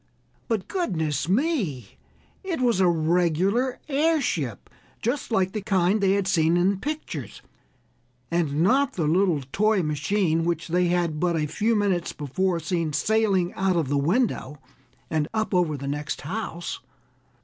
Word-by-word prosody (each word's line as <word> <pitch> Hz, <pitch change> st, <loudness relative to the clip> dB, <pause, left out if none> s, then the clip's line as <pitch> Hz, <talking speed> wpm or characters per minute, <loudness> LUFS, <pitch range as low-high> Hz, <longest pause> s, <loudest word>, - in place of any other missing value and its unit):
But, 220 Hz, -5 st, -1 dB
goodness 160 Hz, -, -1 dB
me! 195 Hz, -, 0 dB, 0.5 s
it 370 Hz, -6 st, -3 dB
was 240 Hz, -6 st, +2 dB
a 185 Hz, -, +5 dB
regular 175 Hz, +9 st, +1 dB
airship, 275 Hz, -, 0 dB, 0.3 s
just 245 Hz, +6 st, -2 dB
like 190 Hz, -4 st, +2 dB
the 215 Hz, -, -3 dB
kind 195 Hz, 0 st, +2 dB
they 195 Hz, -1 st, +3 dB
had 200 Hz, -1 st, 0 dB
seen 170 Hz, -2 st, +3 dB
in 190 Hz, +2 st, +2 dB
pictures, 285 Hz, -, -5 dB, 0.9 s
and 160 Hz, -3 st, 0 dB
not 270 Hz, +8 st, +3 dB
the 165 Hz, -, -1 dB
little 165 Hz, -2 st, +2 dB
toy 215 Hz, -2 st, +2 dB
machine 160 Hz, +2 st, 0 dB
which 170 Hz, 0 st, -2 dB
they 180 Hz, +1 st, +2 dB
had 170 Hz, -3 st, 0 dB
but 175 Hz, 0 st, +1 dB
a 155 Hz, -2 st, 0 dB
few 210 Hz, +10 st, 0 dB
minutes 195 Hz, -5 st, 0 dB
before 170 Hz, +5 st, -1 dB
seen 165 Hz, -1 st, -2 dB
sailing 195 Hz, 0 st, +1 dB
out 190 Hz, -1 st, +1 dB
of 160 Hz, -6 st, 0 dB
the 145 Hz, -, +1 dB
window 150 Hz, -, 0 dB, 0.5 s
and 155 Hz, -2 st, 0 dB
up 220 Hz, -1 st, -1 dB
over 170 Hz, -5 st, +2 dB
the 140 Hz, 0 st, -6 dB
next 150 Hz, +1 st, -3 dB
house. 175 Hz, +1 st, -5 dB
180 Hz, 150 wpm, -25 LUFS, 160-215 Hz, 0.9 s, a